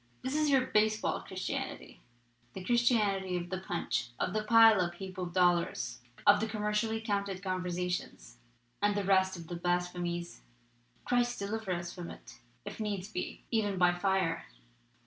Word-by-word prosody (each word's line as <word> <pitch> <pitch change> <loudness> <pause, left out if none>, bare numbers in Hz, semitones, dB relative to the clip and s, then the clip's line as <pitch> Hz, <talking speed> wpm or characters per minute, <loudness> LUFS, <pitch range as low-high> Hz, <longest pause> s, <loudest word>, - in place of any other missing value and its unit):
This 260 - -2
is 305 -1 +2
your 270 -2 +5
baseball 215 -1 +1
Christianity, - - -5 0.5
the 190 - -7
Christianity 210 -5 +2
of 175 0 -6
the 185 - -2
'punch,' 175 -8 -2
of 185 - -1
the 215 0 0
piled 225 -2 +7
up 175 -1 -2
heap 190 0 -8
of 180 -1 -3
dollars, 175 -9 +1 0.2
of 205 0 +7
the 220 - -1
commercially 215 +1 -1
counted 200 -3 -2
'con 185 -1 -1
versions 180 -7 -4 0.2
' 120 +5 -41
and 205 0 +2
the 205 - 0
rest 190 -1 +3
of 170 - -9
the 175 - -6
blasphemies! 175 0 -2 0.6
Christ 245 0 +1
deliver 205 0 -3
us 175 -1 -3
from 175 -2 -7
it, - - -12 0.3
if - - -7
needs 205 -2 -3
be, 180 - -5
even 205 -4 +1
by 180 -1 +4
fire! 175 -2 0
190 Hz, 165 wpm, -32 LUFS, 175-215 Hz, 0.6 s, piled